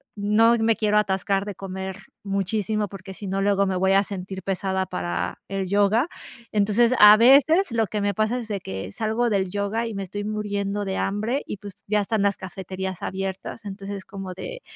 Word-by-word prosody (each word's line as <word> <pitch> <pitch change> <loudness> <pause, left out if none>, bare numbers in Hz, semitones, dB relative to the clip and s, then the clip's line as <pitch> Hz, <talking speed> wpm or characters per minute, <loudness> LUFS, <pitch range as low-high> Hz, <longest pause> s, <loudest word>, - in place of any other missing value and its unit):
no 215 +3 +4
me 225 0 +3
quiero 210 -1 +2
atascar 195 -1 0
de 205 -3 -5
comer 190 0 -6 0.3
muchísimo, 205 +1 -1
porque 195 0 -9
si 205 - -8
no 195 +1 -1
luego 200 0 +3
me 190 -1 -1
voy 190 +1 +3
a 195 +1 +5
sentir 190 -1 -6
pesada 190 0 -1
para 85 - -3
el 195 -1 -2
yoga. 205 - +3 0.4
Entonces, 215 +4 +3
a 210 0 +10
veces, 280 - +5
lo 225 -2 +1
que 210 - -3
me 205 0 +1
pasa 215 +4 0
es 235 - -7
de 205 -2 -3
que 95 - -6
salgo 220 - 0
del 190 -2 +1
yoga, 205 +4 -1
y 225 - -5
me 195 - -3
estoy 205 +2 -5
muriendo 205 -1 -2
de 190 -1 -2
hambre, 215 +8 -1
y - - -4
pues, 200 0 -9
ya 210 +1 +2
están 215 +1 0
las 200 -1 +2
cafeterías 190 -1 -6
abiertas, 195 +3 -5
entonces 195 -1 -6
como 195 -2 -7
de - - -7
200 Hz, 195 wpm, -24 LUFS, 190-215 Hz, 0.4 s, a